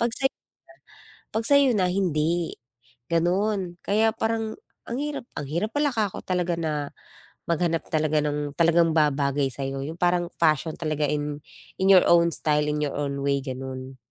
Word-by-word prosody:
Pag 235 +1 +1
sayo 270 - +2
na - - -69 1.0
pag 225 - +1
sayo 280 +1 +5
na 185 - +3
hindi, 170 -2 0 0.6
ganon. 180 +2 0
Kaya 220 +2 +3
parang 225 -1 -1 0.3
ang 235 - -2
hirap 290 -3 -4
ang 145 - -3
hirap 170 +10 -2
pala 290 0 +2
ka 215 -3 +1
ko - - -9
talaga 180 -2 0
na 150 -3 -2 0.6
maghanap 170 -1 0
talaga 155 -1 +1
ng, 145 -1 -2
talagang 165 -1 +4
babagay 140 -3 +2
sayo, 135 +1 -4
yung 155 +4 -6
parang 175 -1 +1
passion 155 -1 +2
talaga 155 -3 -1
in 150 0 -2 0.4
in 190 - +3
your 190 -2 +7
own 170 0 +5
style, 150 -1 +1
in 150 0 -1
your 145 - -3
own 140 -1 -2
way 140 0 +1
ganun. 130 0 -6
165 Hz, 165 wpm, -25 LUFS, 145-190 Hz, 1.0 s, your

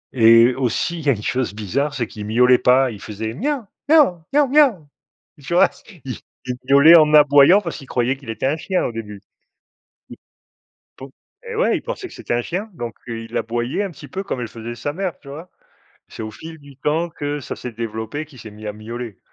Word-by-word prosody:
Et 115 +1 +6
aussi, 135 +6 -1
il 150 - -9
y - - +3
a - - +7
une 105 -1 -7
chose 125 -5 -1
bizarre, 135 +8 -2
c'est 120 -3 -1
qu'il 105 -1 -8
miaulait 125 +3 +4
pas, 125 +1 +4
il 105 - -10
faisait: 110 +1 -5
«Mia, 270 -2 -2 0.2
mia, 270 - +4
mia, 295 -1 +5
mia». 275 - +4 0.6
Tu 170 - -4
vois? 175 - +5 0.4
Il 130 - -5 0.5
miaulait 145 +5 +8
en 155 -1 +4
aboyant 145 +5 +7
parce 170 -4 -5
qu'il 135 -4 -12
croyait 125 +1 0
qu'il 135 -4 -13
était 115 +3 -3
un 140 +3 +2
chien 185 +3 -1
au - - -2
début. 105 -3 -7 0.9
I - - -8 0.8
pou 135 0 -10 0.4
et 465 - -5
ouais, - - +2
il - - -7
pensait - - -6
que - - -14
c'était - - -4
un 120 - +1
chien, 195 - -4
donc 120 -7 -6 0.2
heu, 115 -1 -4
il 115 - -5
aboyait 120 - -2
un 195 - -4
petit - - -12
peu 195 +1 -4
comme 130 -10 -4
elle 120 - -3
faisait 115 +1 -7
sa 145 +5 -3
mère, 185 +1 -3
tu 140 - -14
vois? 160 +6 -9 0.6
C'est - - -8
au 110 - -5
fil 160 +8 -10
du 140 -2 -16
temps 160 +5 0
que 145 -2 -4
ça - - -6
s'est 125 - -7
développé 110 +5 -5
qu'il 140 -4 -17
s'est 110 - -10
mis 105 0 -10
à 105 - -3
miauler, 115 0 -8
135 Hz, 220 wpm, -20 LUFS, 115-165 Hz, 0.9 s, miaulait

